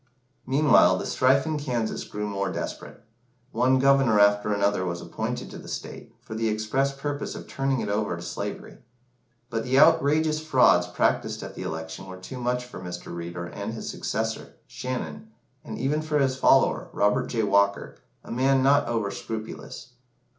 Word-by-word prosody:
Meanwhile, 145 +4 +5
the - - -4
strife 130 +2 +3
in 155 -1 -1
Kansas 120 -6 -2
grew 105 0 -5
more 100 -1 -2
desperate. - - -6 0.5
One 130 +1 +3
Governor 135 -5 +4
after 105 +1 +4
another 100 -1 +1
was 85 -1 -3
appointed - - -4
to - - -8
the - - -12
state, - - -7
for - - -8
the 110 0 0
express 110 +6 0
purpose 145 +1 -4
of - - -8
turning 135 -2 -1
it 105 - -3
over 105 -3 -1
to 85 - -8
slavery; 85 - -6 0.7
but 115 -1 -1
the 130 +1 +1
outrageous 155 0 +4
frauds 155 0 +4
practised - - 0
at - - -7
the - - -8
election 80 +3 -6
were 95 0 -8
too 125 +8 -8
much 125 0 -1
for 125 - -10
Mr. 90 -1 -7
Reeder 85 0 -5
and 100 +5 -6
his 110 - -5
successor, - - -3
Shannon, 125 -13 -5 0.3
and - - -7
even 140 +5 0
for 155 -1 -1
his 135 -2 +2
follower, 130 - +3
Robert 105 0 +2
J. 115 -2 -1
Walker, 100 0 +1 0.3
a - - -10
man 130 +2 +2
not 140 0 +4
over 110 -4 -1
scrupulous. 110 +4 -7
115 Hz, 170 wpm, -26 LUFS, 100-135 Hz, 0.7 s, Meanwhile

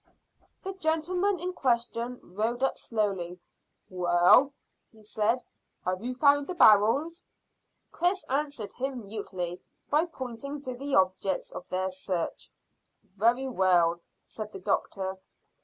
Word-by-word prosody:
The 385 - -4
gentleman 360 +3 0
in 360 +2 -3
question 240 -2 -1
rode 225 +7 -2
slowly 195 -6 -2
up. - - -14 0.5
"Well," 180 +9 +4 0.4
he 220 -1 -19
said, 220 +4 0 0.4
"have 185 +2 -1
you 250 +1 -3
found 285 +1 +4
the 365 - -4
barrels?" 275 - +5 0.7
Chris 365 +2 +1
answered 275 -6 -3
him 260 -3 -4
mutely 185 -4 -5 0.3
by 305 +3 +4
pointing 275 -2 -6
to 255 -2 -5
the 275 +3 -2
objects 185 0 +1
of - - -9
their 185 +1 -1
search. 185 -2 -4 0.7
"Very 235 +6 +2
well," 175 -7 +3 0.2
said 215 -1 -7
the - - -8
doctor. 190 -1 -2
230 Hz, 125 wpm, -28 LUFS, 190-285 Hz, 0.7 s, barrels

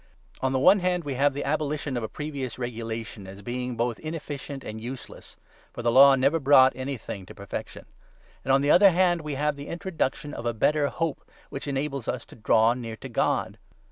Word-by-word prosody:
On 130 - +1
the 135 - +1
one 185 +10 +6
hand, 180 -1 0
we 145 -2 -3
have 140 +2 +2
the 145 - -2
abolition 150 -1 -2
of 120 - -1
a 110 - -4
previous 140 -5 -5
regulation 115 -4 -5
18 - - -8
as - - -12
being 125 +1 -4
both 120 -1 -1
inefficient 145 -3 -6
and 110 +1 -7
useless 125 +2 -9 0.4
(for 120 - -6
the 120 - +2
Law 135 +2 +8
never 140 +5 +2
brought 135 -2 +6
19 130 - -8
anything 125 -7 -5
to - - -11
perfection); 100 0 -7 0.6
and, 135 - 0
on 135 +1 +5
the 145 +1 +3
other 195 +3 +8
hand, 175 -1 +2
we 150 -2 -4
have 150 +1 0
the 140 0 -9
introduction 165 -4 -3
of 120 - -4
a 120 - -1
better 150 +6 +2
hope, 165 +1 -3 0.3
which 135 - -5
enables 140 -2 -3
us - - -3
to - - -15
draw 115 +1 +3
near 115 -3 -6
to - - -9
God. - - 0
135 Hz, 210 wpm, -26 LUFS, 120-150 Hz, 0.6 s, Law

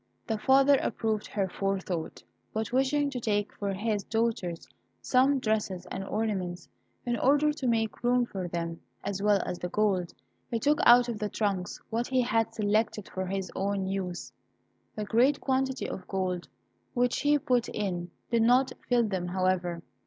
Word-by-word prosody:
The 220 -1 -2
father 275 +3 +5
approved 220 -2 -1
her 195 -2 -1
forethought. 190 - -3 0.3
But 220 0 -2
wishing 280 +2 +2
to 255 - -3
take 205 -3 -1
for 200 -1 -1
his 205 +1 -1
daughters 220 -7 -1 0.3
some 270 +2 +3
dresses 210 -6 -1
and 190 - -3
ornaments, 195 -4 -2 0.4
in 240 -1 0
order 290 +3 +4
to 280 -4 -3
make 225 -1 0
room 245 0 +3
for 190 -5 -5
them 170 -1 -4 0.2
as 200 -1 -3
well 205 -1 +4
as 175 - -4
the 180 - -3
gold, 190 -3 +1 0.4
he 230 - 0
took 295 +6 +2
out 245 +1 +8
of 230 -3 -4
the 210 0 -2
trunks 195 -5 -2
what 235 +2 0
he 255 -1 +2
had 225 -2 +1
selected 215 -1 0
for 190 0 -4
his 190 -1 -3
own 195 0 -1
use. 190 -2 -4 0.6
The 215 - -3
great 245 +7 +3
quantity 265 -1 0
of 190 - -6
coin 185 -2 -1 0.5
which 245 0 +2
he 290 +1 +4
put 250 -4 +1
in 180 -4 -3 0.2
did 235 -1 +3
not 250 +3 +4 0.2
fill 245 -1 +4
them, 190 -5 -2
however. 180 -2 0
215 Hz, 165 wpm, -29 LUFS, 190-245 Hz, 0.6 s, out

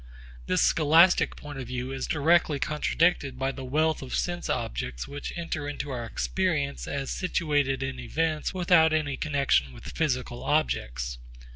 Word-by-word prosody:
This - - +2
scholastic 165 +4 +5
point 145 -2 -8
of 130 - -6
view 125 +1 -4
is 135 0 -3
directly 155 0 +3
contradicted 150 -2 +1
by 135 +1 0
the 135 - -8
wealth 155 +4 +1
of 130 - -4
sense 175 0 -2
objects - - -3
which 145 +1 -6
enter 160 -4 -3
into 145 0 -5
our 120 -2 -4
experience 150 - -1
as 140 -1 -3
situated 145 -7 0
in 130 -1 -4
events 155 +5 -1
without 175 -3 +4
any 150 -3 0
connexion 135 - +1
with - - -10
physical 125 -6 -1
objects. 65 - -1
145 Hz, 150 wpm, -27 LUFS, 130-160 Hz, -, scholastic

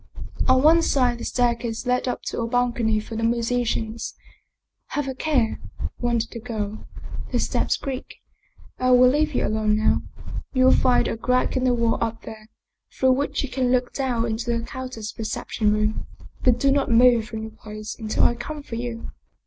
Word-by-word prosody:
On 260 0 +5
one 325 +2 +6
side 250 -6 +1
a - - -5
staircase 235 -1 -1
led 250 +1 +1
up 250 - -3
to - - -3
a 230 - -1
balcony 235 -2 +1
for 220 +1 -7
the 225 - -2
musicians. 230 -1 -1 0.4
" - - -57
Have 290 -2 0
a 265 - -2
care," 260 -5 0 0.4
warned 235 -2 +1
the 230 - -6
girl. 215 -2 -5 0.2
" - - -9
The - - +1
steps - - 0
creak. 270 -2 -6 0.6
I 255 - +2
will 250 0 +7
leave 300 +1 +1
you - - +1
alone 215 0 +1
now. 215 - +2 0.5
You 255 -1 +3
will 260 - +7
find 250 -2 +3
a - - -2
crack 250 +4 +1
in 260 0 +1
the 250 -1 +3
wall 230 -1 +1
up 225 0 -4
there, 215 0 -10 0.4
through 260 0 +2
which 280 +3 0
you 275 - -4
can 255 -1 0
look 250 -1 +1
down 250 -4 0
into 225 +1 -3
the 230 - -4
countess's 255 -5 -6
reception 215 0 -1
room. 215 +1 0 0.4
But 250 -2 +4
do 275 -1 +3
not 275 0 +1
move 235 -1 +5
from 220 -1 -6
your 220 - -7
place 215 -1 -8
until 215 -1 0
I - - +5
come 290 +5 -7
for 230 - -6
you." 235 -1 -5
240 Hz, 195 wpm, -24 LUFS, 225-255 Hz, 0.6 s, will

